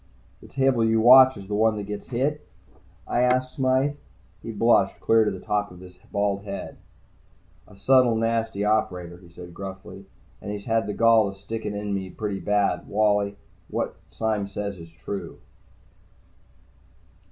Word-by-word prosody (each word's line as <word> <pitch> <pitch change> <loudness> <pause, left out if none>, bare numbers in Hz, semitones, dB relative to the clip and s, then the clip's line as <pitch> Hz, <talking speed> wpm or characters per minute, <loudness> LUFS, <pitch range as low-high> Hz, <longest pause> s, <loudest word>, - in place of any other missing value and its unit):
"The - - -13
table 135 -3 +1
you 110 0 +2
watch 130 +2 +8
is 100 -1 -10
the 105 - -5
one 110 +1 +2
that 105 - -4
gets 105 0 -7
hit?" 140 +5 -1 0.6
I 120 - 0
asked 125 +1 +1
Smythe. 135 +1 +1 0.4
He 115 - -6
blushed, 105 -3 +2
clear 115 0 +4
to 105 - +1
the 95 -2 -6
top 105 +1 -1
of 90 - -14
his 90 0 -14
bald 100 -1 0
head. 100 -1 -7 0.9
"A 105 - -17
subtle, 125 +3 +4
nasty 115 -2 -1
operator," 90 -5 -1
he 90 -2 -17
said 85 0 -12
gruffly. 95 0 -9 0.3
"And 105 - -6
he's 105 -1 -6
had 115 -3 0
the 105 - -4
gall 115 -3 +4
to 95 - -14
stick 110 +3 -6
it 105 - -4
in 105 0 -3
me 95 -1 -3
pretty 100 -1 -4
badly, 105 -1 0
Wally. 105 -1 +1 0.3
What - - -3
Sime 110 -3 -2
says 100 -1 -5
is 85 0 -11
true." 85 +2 -7
105 Hz, 165 wpm, -24 LUFS, 100-115 Hz, 0.9 s, watch